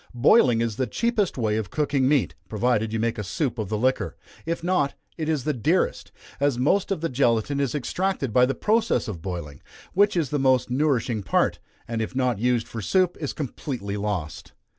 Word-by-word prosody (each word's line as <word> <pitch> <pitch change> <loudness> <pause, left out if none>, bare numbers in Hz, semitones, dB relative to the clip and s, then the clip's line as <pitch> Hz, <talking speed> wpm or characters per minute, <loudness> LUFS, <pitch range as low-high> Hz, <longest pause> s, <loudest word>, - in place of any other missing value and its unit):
Boiling 120 - +5
is 115 -2 -2
the 130 - 0
cheapest 230 - 0
way 110 -3 0
of 110 -4 -3
cooking 140 -3 +1
meat, 145 -4 +2 0.2
provided 110 0 +1
you 110 - -1
make 115 0 -1
a - - -2
soup 130 - -2
of 105 -3 -3
the 110 - -1
liquor; 130 +4 0 0.3
if 165 0 -2
not, 170 -6 +1 0.2
it 160 -1 -3
is 150 -5 0
the 150 - 0
dearest, 120 -5 0 0.3
as 140 -3 +2
most 180 +12 +2
of 190 - -1
the 165 - 0
gelatine 125 0 +1
is 140 -2 0
extracted 150 - -1
by 125 +1 +5
the 135 - -1
process 225 - +1
of 95 -7 -5
boiling, 85 -6 -6 0.3
which 205 0 +3
is 155 -7 0
the 145 - 0
most 130 -2 +2
nourishing 125 -5 +1
part, 95 - +1 0.3
and 115 -1 -2
if 110 - -4
not 125 -5 +1
used 120 0 +1
for 115 - -6
soup, 185 - +2
is 145 - -3
completely 125 -7 -4
lost. 100 -7 -4
125 Hz, 200 wpm, -25 LUFS, 110-150 Hz, 0.3 s, Boiling